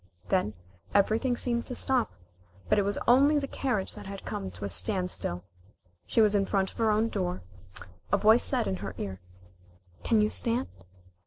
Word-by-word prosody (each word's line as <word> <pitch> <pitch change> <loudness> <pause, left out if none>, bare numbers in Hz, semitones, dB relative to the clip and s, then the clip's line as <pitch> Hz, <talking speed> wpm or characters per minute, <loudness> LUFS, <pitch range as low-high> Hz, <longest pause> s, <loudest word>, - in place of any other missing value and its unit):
Then 185 - +1 0.4
everything 225 +5 +2
seemed 235 -1 -2
to 250 - -5
stop, 255 -2 +1 0.6
but 210 - +3
it - - +4
was 200 +1 -1
only 280 +5 +6
the 285 - 0
carriage 245 -9 -2
that - - -9
had 195 0 -8
come 95 -1 -4
to 90 +2 -7
a - - -3
standstill. 180 - -2 0.6
She 230 - +3
was 215 -1 +5
in 200 -1 +2
front 195 -2 0
of - - -16
her 225 -1 +3
own 215 +1 +2
door. 90 - -3 0.7
A 200 - +4
voice 220 +4 +5
said - - +2
in 95 -2 -1
her 95 0 -6
ear, 95 -2 -5 0.8
"Can 225 - +3
you 210 0 +2
stand?" 235 +2 -1
205 Hz, 180 wpm, -28 LUFS, -, 0.8 s, only